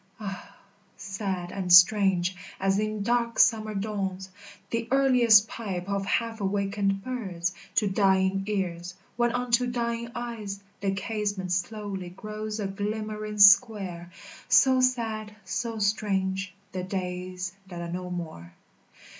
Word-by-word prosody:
Ah, 195 Hz, -3 st, -7 dB, 0.4 s
sad 190 Hz, -2 st, -4 dB
and 185 Hz, -2 st, -3 dB
strange 185 Hz, 0 st, +6 dB, 0.2 s
as 195 Hz, +1 st, +1 dB
in 215 Hz, -1 st, -2 dB
dark 235 Hz, +1 st, 0 dB
summer 215 Hz, -2 st, +3 dB
dawns 195 Hz, -2 st, -3 dB, 0.4 s
The 230 Hz, 0 st, -2 dB
earliest 250 Hz, -6 st, +5 dB
pipe 195 Hz, -6 st, -5 dB
of 200 Hz, -1 st, -2 dB
half 230 Hz, 0 st, -1 dB
awakened 195 Hz, 0 st, 0 dB
birds 190 Hz, -9 st, -3 dB, 0.2 s
To 210 Hz, -, +3 dB
dying 190 Hz, -1 st, +2 dB
ears, 180 Hz, -3 st, -3 dB, 0.2 s
when 240 Hz, 0 st, +2 dB
unto 245 Hz, 0 st, +1 dB
dying 235 Hz, -1 st, -2 dB
eyes 225 Hz, -5 st, -5 dB, 0.2 s
The 195 Hz, -1 st, -1 dB
casement 205 Hz, -2 st, -3 dB
slowly 190 Hz, 0 st, -3 dB
grows 215 Hz, +3 st, -6 dB
a 205 Hz, -, -2 dB
glimmering 210 Hz, +2 st, -4 dB
square; 200 Hz, -4 st, +5 dB, 0.4 s
So 260 Hz, -1 st, +5 dB
sad, 225 Hz, -4 st, -1 dB
so 230 Hz, -2 st, -3 dB
strange, 195 Hz, -2 st, 0 dB, 0.2 s
the 185 Hz, -1 st, -4 dB
days 185 Hz, -1 st, -4 dB
that 175 Hz, -2 st, -7 dB
are 170 Hz, 0 st, -5 dB
no 180 Hz, +1 st, -4 dB
more. 160 Hz, -, -7 dB
200 Hz, 125 wpm, -27 LUFS, 190-220 Hz, 0.4 s, strange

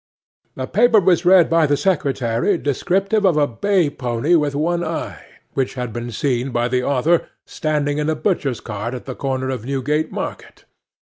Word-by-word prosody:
'A 130 Hz, -, -2 dB
paper 225 Hz, -, +4 dB
was 180 Hz, -2 st, +2 dB
read 180 Hz, -1 st, +6 dB
by 165 Hz, -2 st, +3 dB
the 145 Hz, 0 st, +2 dB
secretary 140 Hz, -, 0 dB
descriptive 195 Hz, -, 0 dB
of 180 Hz, -6 st, +3 dB
a 150 Hz, -, +4 dB
bay 170 Hz, -, +1 dB
pony 125 Hz, +2 st, -1 dB
with 150 Hz, -4 st, +2 dB
one 170 Hz, +4 st, 0 dB
eye, -, -, -5 dB, 0.3 s
which 135 Hz, -1 st, -1 dB
had 125 Hz, -3 st, -4 dB
been 120 Hz, 0 st, -5 dB
seen 125 Hz, +2 st, -1 dB
by 120 Hz, -1 st, 0 dB
the 125 Hz, 0 st, 0 dB
author 140 Hz, +6 st, +1 dB, 0.2 s
standing 150 Hz, -1 st, -1 dB
in 150 Hz, +1 st, 0 dB
a 155 Hz, -, +1 dB
butcher's 145 Hz, -, -1 dB
cart 105 Hz, +5 st, -5 dB
at 125 Hz, -, -8 dB
the 130 Hz, -, -5 dB
corner 130 Hz, 0 st, -2 dB
of 125 Hz, -5 st, -4 dB
Newgate 140 Hz, +4 st, -1 dB
Market. -, -, -7 dB
145 Hz, 180 wpm, -20 LUFS, 125-170 Hz, 0.3 s, read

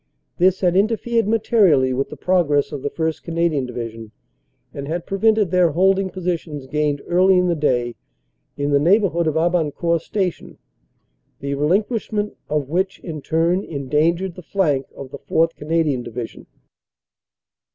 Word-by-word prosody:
This 185 Hz, +1 st, +3 dB
had 180 Hz, -2 st, +2 dB
interfered 225 Hz, +2 st, +1 dB
materially 200 Hz, -, +3 dB
with 135 Hz, +2 st, -1 dB
the -, -, -9 dB
progress 150 Hz, -6 st, +1 dB
of 145 Hz, -, -5 dB
the 145 Hz, -, -2 dB
1st. 160 Hz, 0 st, -2 dB
Canadian 165 Hz, -5 st, -1 dB
Division, 115 Hz, -2 st, -6 dB, 0.6 s
and 140 Hz, 0 st, -6 dB
had 170 Hz, +2 st, -3 dB
prevented 210 Hz, -1 st, +2 dB
their 180 Hz, -2 st, +4 dB
holding 190 Hz, +3 st, +2 dB
positions 170 Hz, -6 st, -4 dB
gained 150 Hz, +1 st, -1 dB
early 185 Hz, +2 st, +4 dB
in 180 Hz, -, +3 dB
the 175 Hz, -, +2 dB
day 125 Hz, -6 st, 0 dB, 0.6 s
in 145 Hz, 0 st, -1 dB
the 140 Hz, -, +4 dB
neighborhood 170 Hz, 0 st, +2 dB
of 155 Hz, -, 0 dB
Aban 165 Hz, -2 st, +1 dB
court 170 Hz, -1 st, 0 dB
Station, 185 Hz, -1 st, -3 dB, 0.8 s
the 140 Hz, 0 st, -3 dB
relinquishment 205 Hz, -, 0 dB
of 150 Hz, -3 st, -1 dB
which, 185 Hz, +6 st, -1 dB
in 155 Hz, -4 st, -6 dB
turn, 165 Hz, +6 st, +1 dB
endan 150 Hz, +3 st, 0 dB
gered 190 Hz, 0 st, -4 dB
the 180 Hz, -, -10 dB
flank 155 Hz, -7 st, 0 dB
of 135 Hz, -1 st, -9 dB
the -, -, -8 dB
4th. 165 Hz, +1 st, +1 dB
Canadian 150 Hz, -4 st, 0 dB
Division." 120 Hz, -1 st, -7 dB
165 Hz, 150 wpm, -21 LUFS, 145-185 Hz, 0.8 s, their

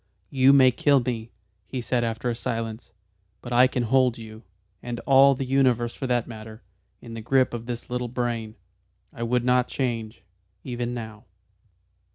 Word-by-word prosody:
"You 135 Hz, -1 st, +5 dB
may 130 Hz, -2 st, +6 dB
kill 140 Hz, +3 st, +3 dB
me," 115 Hz, -2 st, -4 dB, 0.4 s
he 130 Hz, -, -4 dB
said 120 Hz, 0 st, -1 dB
after 115 Hz, +1 st, -3 dB
a 120 Hz, -, +1 dB
silence. 115 Hz, -1 st, -4 dB, 0.5 s
"But 120 Hz, +3 st, -7 dB
I 125 Hz, +2 st, +6 dB
can 125 Hz, -1 st, -2 dB
hold 125 Hz, 0 st, +2 dB
you 110 Hz, -1 st, -10 dB, 0.4 s
and 120 Hz, -1 st, -5 dB
all 135 Hz, 0 st, +5 dB
the 135 Hz, -, -3 dB
universe 125 Hz, -3 st, +2 dB
for 130 Hz, -, -5 dB
that 120 Hz, -2 st, +1 dB
matter 110 Hz, -1 st, -10 dB, 0.4 s
in 115 Hz, -, -10 dB
the 115 Hz, -, -6 dB
grip 130 Hz, +3 st, +2 dB
of 115 Hz, 0 st, -6 dB
this 120 Hz, -1 st, -5 dB
little 125 Hz, 0 st, -3 dB
brain. 120 Hz, -2 st, -3 dB, 0.6 s
I -, -, -9 dB
would 120 Hz, +1 st, 0 dB
not 125 Hz, 0 st, +3 dB
change. 115 Hz, -4 st, -3 dB, 0.4 s
Even 120 Hz, -1 st, -4 dB
now." 110 Hz, -2 st, -8 dB
120 Hz, 170 wpm, -25 LUFS, 115-130 Hz, 0.6 s, may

